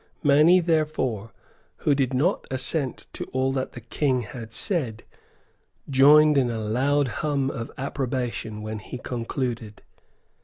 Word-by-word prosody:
Many, 155 +6 +6
therefore, 150 - -1 0.5
who 145 - +5
did 135 -2 +1
not 145 +9 0
assent 130 +1 -1
to - - -5
all 130 +1 -1
that 130 -1 -3
the 120 - -9
King 130 +2 0
had 110 0 -8
said, 120 - -2 0.8
joined 145 +2 +6
in 125 -2 +1
a 115 - -3
loud 130 +7 +1
hum 140 -3 0
of 115 -2 -5
approbation 125 -5 -3
when 110 0 -5
he 110 - -8
concluded. 120 -3 -4
130 Hz, 130 wpm, -25 LUFS, 115-145 Hz, 0.8 s, Many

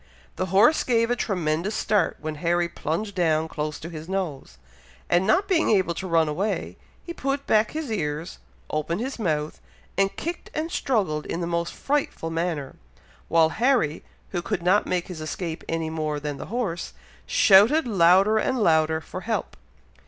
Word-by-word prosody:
The 185 - -2
horse 200 - +4
gave 230 -1 +2
a - - +3
tremendous 180 -2 -1
start 205 -4 +1
when 155 0 -4
Harry 175 0 +2
plunged 170 +5 -3
down 160 -3 +1
close 150 -1 -4
to 165 - -7
his 160 +1 -8
nose, 185 -8 -4 0.5
and 175 +3 +3
not 380 - +3
being 350 -4 +2
able 190 -5 +3
to 185 +3 -5
run 165 -2 +3
away, 185 +8 -2 0.3
he 340 - -6
put 275 -2 -2
back 215 0 +3
his 310 -5 -5
ears, 160 -4 -3 0.3
opened 155 +4 -1
his 260 +2 -4
mouth, 155 -6 -2 0.4
and 195 0 +2
kicked 340 +2 -5
and 320 +2 -2
struggled 190 - 0
in 165 - -3
the 175 - -2
most 170 0 -1
frightful 275 - -2
manner, 165 -5 -3 0.5
while 165 -1 +4
Harry, 230 - +1 0.3
who 175 - -2
could 170 - -3
not 190 +4 +3
make 180 -1 -1
his 175 -4 -7
escape 160 +1 -4
any 165 -1 -2
more 155 -2 -2
than 145 -1 -4
the - - -7
horse, 205 -7 -3 0.3
shouted 220 +11 +6
louder 195 +2 +5
and 260 - 0
louder 160 -6 +3
for - - -7
help. - - -3
175 Hz, 170 wpm, -25 LUFS, 160-215 Hz, 0.5 s, shouted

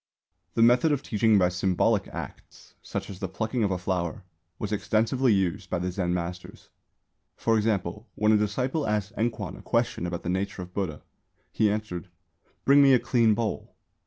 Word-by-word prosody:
_ - - -45
The 115 - +4
method 125 +7 +5
of 145 -2 0
teaching 110 0 +3
by 90 -2 +4
symbolic 90 0 +1
acts - - -10
(such - - -5
as 95 -2 -9
the 95 - -2
plucking 110 +4 -2
of 100 - +2
a 95 - 0
flower) 90 0 -2 0.3
was 105 - -4
extensively 115 +4 +1
used 95 0 0
by - - 0
the 90 +1 -2
Zen 90 -1 -1
masters. 90 +1 -5 0.7
For 115 - +1
example, 105 -1 -1
when 105 0 +3
a 110 - +5
disciple 125 +8 -1
asked 105 0 -1
Enkwan 115 0 -2
a - - -11
question 115 -7 0
about 85 0 -4
the - - -5
nature 95 +1 -2
of 90 0 -13
Buddha, 95 -7 -3 0.5
he 110 - +2
answered, 105 -3 -3 0.6
"Bring 140 +1 +7
me 135 -1 +7
a - - +3
clean 115 -2 +3
bowl." 115 -1 -3
105 Hz, 185 wpm, -27 LUFS, 90-115 Hz, 0.7 s, Bring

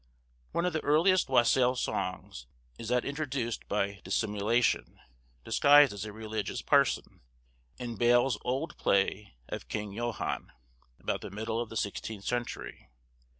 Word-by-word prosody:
One 170 - 0
of 180 - 0
the 155 - -2
earliest 170 +5 +3
wassail 125 0 +4
songs 65 - -4 0.3
is 115 - -6
that 125 +1 +1
introduced 140 -6 -3
by 100 -1 -1
Dissimulation, 110 +2 0 0.5
disguised 145 -3 +6
as 100 +1 -5
a 105 - -6
religious 110 -2 -4
person, - - +2 0.6
in 120 -3 -5
Bale's 120 0 +3
old 135 +6 -2
play 100 -4 +1
of - - -6
Kynge 105 -2 -4
Johan, 120 0 -3 0.5
about - - -2
the - - -7
middle 110 +3 -3
of 120 - -5
the 115 - -5
sixteenth 105 0 -4
century. 120 - -4
120 Hz, 135 wpm, -30 LUFS, 105-130 Hz, 0.6 s, disguised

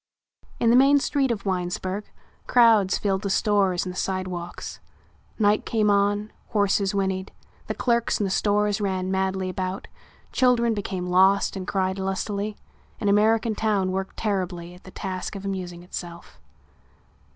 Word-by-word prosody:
In 230 - +4
the - - +5
main 275 +3 +6
street 275 -1 +1
of 215 -4 -2
Winesburg 185 +2 -2 0.4
crowds 225 -6 +5
filled 195 -2 0
the 200 - -3
stores 195 -3 +2
and 180 - -4
the - - -4
sidewalks. 185 -2 -4 0.6
Night 210 -1 +3
came 215 -2 +1
on, 205 +1 +1
horses 200 -1 +1
whinnied, 190 -1 -1 0.4
the - - -3
clerks 235 -2 +1
in - - +1
the 195 - -1
stores 210 +1 +1
ran 190 -2 -1
madly 190 0 0
about, 185 +1 -4 0.4
children 240 -3 +3
became 195 -3 -3
lost 190 +3 +3
and 190 -1 -5
cried 190 0 -1
lustily, 200 +2 -2 0.4
an 205 - 0
American 220 +2 +3
town 205 -3 0
worked 190 +1 -4
terribly 180 -5 -2
at 180 - -17
the - - -10
task 185 +1 -5
of 195 0 -7
amusing 180 -3 -5
itself. 175 -1 -8
195 Hz, 150 wpm, -25 LUFS, 185-210 Hz, 0.6 s, main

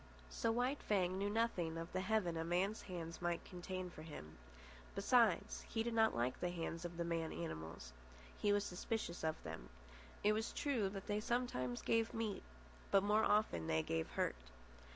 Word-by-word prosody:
So 230 - +1
White 250 +5 +1
Fang 185 -2 +1
knew 200 +1 +1
nothing 205 -7 +1
of 165 0 -5
the 185 - +1
heaven 190 -4 +1
a 160 - -1
man's 180 +6 +1
hand 165 -2 -5
might 175 -1 0
contain 180 0 -5
for 155 - -10
him. 80 - -9 0.6
Besides, 210 -2 +4
he 225 - 0
did 235 0 -1
not 220 -1 +4
like 120 +2 0
the 180 - 0
hands 165 -1 -3
of 175 -1 -5
the 170 - 0
man 165 -1 -1
animals. 80 - -5 0.4
He 205 - +2
was 205 0 +3
suspicious 180 -1 -3
of 160 0 +1
them. 80 -6 -6 0.5
It 210 - +5
was 220 +1 -1
true 245 -9 +1
that 195 0 -6
they 210 0 0
sometimes 210 - -1
gave 225 0 +2
meat, 220 -3 -1 0.5
but 195 -1 +5
more 210 +2 +4
often 205 - +3
they 80 0 +2
gave 80 0 -1
hurt. - - -1
185 Hz, 180 wpm, -40 LUFS, 165-215 Hz, 0.6 s, It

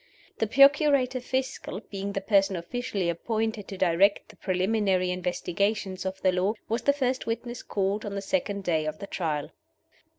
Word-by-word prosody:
The 220 - +1
Procurator 275 0 +5
Fiscal 260 -5 -3
being 200 0 -4
the 195 - -2
person 195 -2 +3
officially 195 +1 -3
appointed 220 +4 -2
to 195 - -7
direct 190 +4 +3
the 215 - -14
preliminary 185 0 +1
investigations 185 +2 -1
of 190 0 -4
the 185 - +5
law 185 +4 +1
was 230 +2 -1
the 280 - +4
first 260 -3 -1
witness 240 +1 -3
called 200 +1 -1
on 205 -1 -5
the 200 - -2
second 205 -4 -1
day 160 -4 0
of 155 0 -3
the - - -7
Trial. 155 -7 -3
200 Hz, 165 wpm, -27 LUFS, 185-230 Hz, -, Procurator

